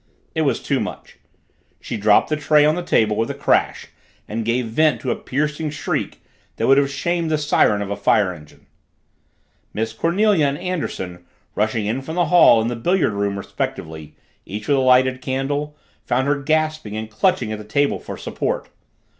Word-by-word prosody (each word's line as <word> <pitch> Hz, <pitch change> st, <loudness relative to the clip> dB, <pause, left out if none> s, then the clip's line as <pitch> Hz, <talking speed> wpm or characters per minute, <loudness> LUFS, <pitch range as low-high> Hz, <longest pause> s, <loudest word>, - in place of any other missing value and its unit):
It -, -, 0 dB
was -, -, +1 dB
too -, -, 0 dB
much. -, -, -7 dB, 0.6 s
She -, -, -6 dB
dropped 105 Hz, -1 st, +3 dB
the 155 Hz, -, +1 dB
tray 150 Hz, 0 st, +3 dB
on 155 Hz, -, +4 dB
the 180 Hz, -, -2 dB
table 110 Hz, -11 st, +2 dB
with 115 Hz, +2 st, -1 dB
a -, -, -4 dB
crash -, -, 0 dB, 0.4 s
and 115 Hz, +2 st, -3 dB
gave 115 Hz, +2 st, 0 dB
vent 150 Hz, +8 st, +2 dB
to 130 Hz, -, -1 dB
a -, -, 0 dB
piercing 150 Hz, +3 st, -2 dB
shriek 150 Hz, 0 st, -4 dB, 0.3 s
that -, -, -1 dB
would 135 Hz, +1 st, +5 dB
have 140 Hz, -1 st, +1 dB
shamed 170 Hz, +4 st, -1 dB
the 155 Hz, -, +1 dB
siren 105 Hz, -8 st, +2 dB
of 100 Hz, -, -6 dB
a -, -, -1 dB
fire 100 Hz, -2 st, +2 dB
engine. 75 Hz, -2 st, -16 dB, 1.1 s
Miss 110 Hz, +1 st, -2 dB
Cornelia 175 Hz, -, +2 dB
and 140 Hz, +1 st, -2 dB
Anderson, 95 Hz, -, -4 dB, 0.3 s
rushing 110 Hz, 0 st, 0 dB
in 115 Hz, +6 st, -1 dB
from 160 Hz, +5 st, -7 dB
the 175 Hz, -1 st, +2 dB
hall 160 Hz, -9 st, +7 dB
and 115 Hz, +2 st, -1 dB
the -, -, -3 dB
billiard 170 Hz, -, +1 dB
room 100 Hz, 0 st, -1 dB
respectively, 80 Hz, -5 st, -5 dB, 0.3 s
each 105 Hz, +2 st, -7 dB
with 140 Hz, -, +3 dB
a -, -, +2 dB
lighted 130 Hz, 0 st, +3 dB
candle, 145 Hz, +3 st, -3 dB, 0.3 s
found 130 Hz, +2 st, 0 dB
her 140 Hz, 0 st, 0 dB
gasping 155 Hz, -7 st, -1 dB
and 110 Hz, 0 st, -6 dB
clutching 115 Hz, -, +1 dB
at 110 Hz, -, -4 dB
the -, -, -8 dB
table 140 Hz, +7 st, 0 dB
for -, -, -8 dB
support. -, -, -3 dB
130 Hz, 190 wpm, -21 LUFS, 110-150 Hz, 1.1 s, hall